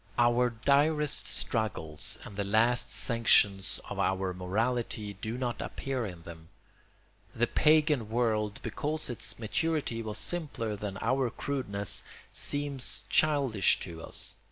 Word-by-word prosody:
Our 120 Hz, +1 st, +4 dB, 0.2 s
direst 150 Hz, +1 st, +3 dB
struggles 90 Hz, -10 st, -1 dB
and 100 Hz, -, -10 dB
the 100 Hz, -, -1 dB
last 110 Hz, +4 st, +2 dB
sanctions 105 Hz, -4 st, +3 dB
of -, -, -6 dB
our 95 Hz, -1 st, 0 dB
morality 105 Hz, +3 st, -2 dB
do 110 Hz, +4 st, -5 dB
not 125 Hz, -2 st, -3 dB
appear 130 Hz, -4 st, -3 dB
in 90 Hz, -3 st, -10 dB
them. 80 Hz, -1 st, -11 dB, 0.9 s
The 120 Hz, -, +2 dB
pagan 150 Hz, -4 st, +3 dB
world, 110 Hz, -3 st, 0 dB
because 155 Hz, -2 st, -2 dB
its 120 Hz, -, -3 dB
maturity 120 Hz, +1 st, -1 dB
was 110 Hz, -1 st, -4 dB
simpler 115 Hz, -2 st, -2 dB
than 100 Hz, -1 st, -5 dB
our 130 Hz, +1 st, +1 dB
crudeness, 110 Hz, -7 st, -1 dB, 0.3 s
seems 145 Hz, -3 st, -1 dB
childish 140 Hz, -10 st, +3 dB
to 85 Hz, -2 st, -7 dB
us. -, -, -2 dB
115 Hz, 125 wpm, -30 LUFS, 100-135 Hz, 0.9 s, Our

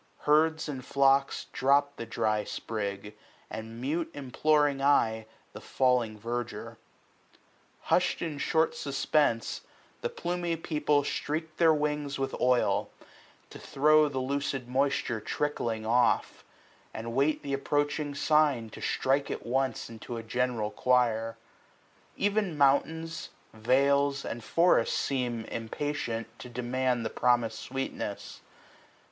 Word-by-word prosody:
Herds 155 Hz, +2 st, +3 dB
and 135 Hz, -4 st, -5 dB
flocks 135 Hz, +1 st, +2 dB
Drop 140 Hz, +2 st, +2 dB
the 115 Hz, -, -7 dB
dry 105 Hz, -1 st, 0 dB
sprig, 105 Hz, -1 st, -5 dB, 0.4 s
and 115 Hz, +1 st, -7 dB
mute 155 Hz, +6 st, -2 dB
imploring 145 Hz, +1 st, +1 dB
eye 110 Hz, -6 st, +2 dB, 0.3 s
The -, -, -9 dB
falling 125 Hz, -4 st, +1 dB
verdure. 120 Hz, +2 st, -5 dB, 1.0 s
Hush'd -, -, +1 dB
in 155 Hz, -4 st, -4 dB
short 160 Hz, +3 st, +1 dB
suspense. 140 Hz, -3 st, 0 dB, 0.4 s
The 480 Hz, -, -1 dB
plumy 175 Hz, -, -2 dB
people 150 Hz, -3 st, +1 dB
streak 155 Hz, +3 st, -3 dB
their, 165 Hz, -2 st, +5 dB
wings 150 Hz, -2 st, -1 dB
with 135 Hz, 0 st, -2 dB
oil, 125 Hz, -1 st, +2 dB
SPRING. -, -, -23 dB, 0.4 s
To -, -, -10 dB
throw 150 Hz, +2 st, +4 dB
the 135 Hz, -2 st, -3 dB
ludd 135 Hz, -1 st, -2 dB
moisture 130 Hz, -3 st, 0 dB
trickling 115 Hz, -4 st, -2 dB
off; 120 Hz, +1 st, +2 dB, 0.5 s
165 -, -, -18 dB
And 115 Hz, +1 st, -5 dB
wait 140 Hz, +3 st, +1 dB
th* 140 Hz, -, -3 dB
approaching 145 Hz, +1 st, -1 dB
sign 140 Hz, -7 st, +2 dB
to -, -, -10 dB
strike 135 Hz, +1 st, +1 dB
at -, -, -5 dB
once. 130 Hz, +2 st, -1 dB
Into 115 Hz, +1 st, -8 dB
the 115 Hz, -, -5 dB
general 120 Hz, -2 st, -1 dB
choir. 115 Hz, -3 st, +1 dB, 0.8 s
Ev*n 205 Hz, -5 st, 0 dB
mountains, 160 Hz, +4 st, +1 dB, 0.2 s
vales. 140 Hz, +5 st, +2 dB
And 120 Hz, 0 st, -5 dB
forests 165 Hz, -6 st, +3 dB
seem, 120 Hz, -4 st, -1 dB
impatient, 115 Hz, 0 st, -3 dB
to 125 Hz, -, -9 dB
demand 125 Hz, 0 st, -1 dB
The 110 Hz, -, -2 dB
promis*d 120 Hz, -2 st, +2 dB
sweetness. 135 Hz, -6 st, -5 dB
135 Hz, 125 wpm, -29 LUFS, 120-150 Hz, 1.0 s, their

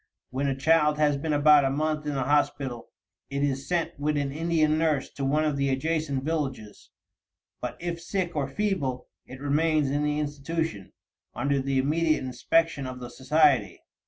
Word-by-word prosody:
When 135 Hz, +2 st, -1 dB
a 135 Hz, -, 0 dB
child 150 Hz, +1 st, +3 dB
has 150 Hz, -1 st, +3 dB
been 150 Hz, +3 st, -3 dB
about 145 Hz, 0 st, +6 dB
a 135 Hz, -, +2 dB
month 150 Hz, +2 st, -1 dB
in 145 Hz, -, -2 dB
the 135 Hz, -, 0 dB
hospital, 135 Hz, -3 st, 0 dB, 0.4 s
it 140 Hz, 0 st, -2 dB
is 135 Hz, -1 st, -1 dB
sent 170 Hz, -3 st, -1 dB
with 150 Hz, +1 st, 0 dB
an 140 Hz, -1 st, -1 dB
Indian 155 Hz, 0 st, +1 dB
nurse 155 Hz, -4 st, 0 dB
to 140 Hz, -, -6 dB
one 150 Hz, +3 st, +2 dB
of 150 Hz, -2 st, 0 dB
the 140 Hz, 0 st, +1 dB
adjacent 140 Hz, 0 st, -1 dB
villages; 135 Hz, -9 st, -4 dB, 0.7 s
but -, -, -4 dB
if 170 Hz, -1 st, -4 dB
sick 175 Hz, -1 st, -2 dB
or 140 Hz, -3 st, 0 dB
feeble, 140 Hz, -7 st, -2 dB, 0.2 s
it 130 Hz, -, -10 dB
remains 150 Hz, 0 st, +1 dB
in 145 Hz, +1 st, 0 dB
the 150 Hz, 0 st, 0 dB
institution, 150 Hz, -, -3 dB, 0.4 s
under 140 Hz, +2 st, 0 dB
the 135 Hz, 0 st, -1 dB
immediate 155 Hz, +4 st, +1 dB
inspection 140 Hz, +3 st, 0 dB
of 130 Hz, 0 st, -7 dB
the 125 Hz, -1 st, -8 dB
society. 150 Hz, 0 st, +2 dB
145 Hz, 175 wpm, -27 LUFS, 135-155 Hz, 0.7 s, about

